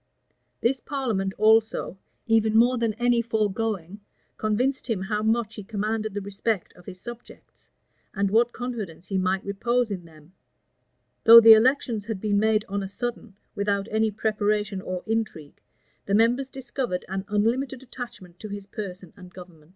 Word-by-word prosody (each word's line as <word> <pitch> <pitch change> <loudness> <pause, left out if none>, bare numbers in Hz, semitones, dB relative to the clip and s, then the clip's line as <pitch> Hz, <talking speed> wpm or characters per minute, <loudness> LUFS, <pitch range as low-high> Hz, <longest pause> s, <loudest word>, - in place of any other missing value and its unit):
This 260 +3 +1
parliament 230 -10 -2
also, 220 -2 +3 0.3
even 220 -1 +3
more 245 +2 +4
than 225 -2 0
any 240 0 +2
foregoing, 210 -4 -2 0.4
convinced 250 +5 -1
him 200 -5 -1
how 210 +2 -2
much 220 0 0
he 210 - -8
commanded 215 0 -3
the 205 - -2
respect 200 0 -3
of 180 - -18
his 180 - -8
subjects, 240 +4 -12 0.5
and 200 -1 0
what 235 +2 +3
confidence 215 -10 -6
he 195 -2 0
might 185 +1 0
repose 235 +3 0
in 180 -3 -5
them. 160 +1 -18 0.9
Though 230 0 +12
the 225 -1 +10
elections 230 -2 +2
had 220 -3 -4
been 205 0 +1
made 215 0 +2
on 200 +1 -2
a 195 - -5
sudden, 235 -1 -5 0.2
without 200 0 -1
any 220 0 +2
preparation 210 -2 -1
or 185 -1 -5
intrigue, 215 -10 -3 0.5
the 200 - +2
members 240 +5 +2
discovered 255 -7 -4
an 190 +1 -3
unlimited 240 +5 0
attachment 210 -9 -10
to 215 - -7
his 200 -1 -6
person 185 -3 -8
and 180 0 -13
government. 175 -4 -14
215 Hz, 160 wpm, -25 LUFS, 195-230 Hz, 0.9 s, Though